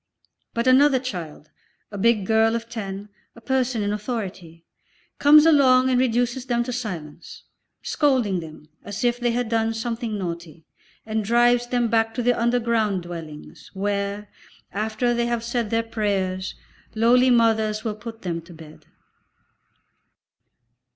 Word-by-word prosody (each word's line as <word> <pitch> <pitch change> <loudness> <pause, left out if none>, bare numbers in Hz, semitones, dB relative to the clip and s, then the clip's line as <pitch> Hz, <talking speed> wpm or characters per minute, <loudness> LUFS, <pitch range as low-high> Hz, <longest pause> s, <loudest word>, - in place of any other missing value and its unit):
But 235 +1 0
another 265 +2 +5
child, 175 - -7 0.4
a 205 - -6
big 215 -1 +2
girl 225 +2 +3
of 230 0 -4
ten, 205 -3 -6 0.3
a - - -13
person 255 -2 -1
in 205 0 -1
authority, 190 -7 -6 0.5
comes 300 +2 +7
along 260 -5 +5
and 250 - +3
reduces 245 +1 0
them 240 -1 +1
to 250 +1 -5
silence, 175 -10 -7 0.4
scolding 255 - +1
them 155 -2 -11 0.2
as 205 +2 -6
if 240 0 +1
they 240 -1 +1
had 240 0 -1
done 225 0 0
something 225 -1 -3
naughty, 170 -4 -6 0.4
and 220 0 -2
drives 240 +2 +3
them 245 -1 +1
back 225 0 +1
to 245 - -2
the 245 +1 +3
underground 230 -5 0
dwellings, 165 -3 -9
where, 200 +1 -2 0.4
after 220 +4 -1
they 235 0 0
have 235 -1 -2
said 235 -2 -2
their 230 +1 +1
prayers, 195 -4 -2 0.4
lowly 245 +3 +4
mothers 220 -3 +2
will 220 - -2
put 225 +1 -10
them 170 -2 -3
to 170 +1 -14
bed. 155 -1 -14
225 Hz, 145 wpm, -23 LUFS, 200-240 Hz, 0.5 s, comes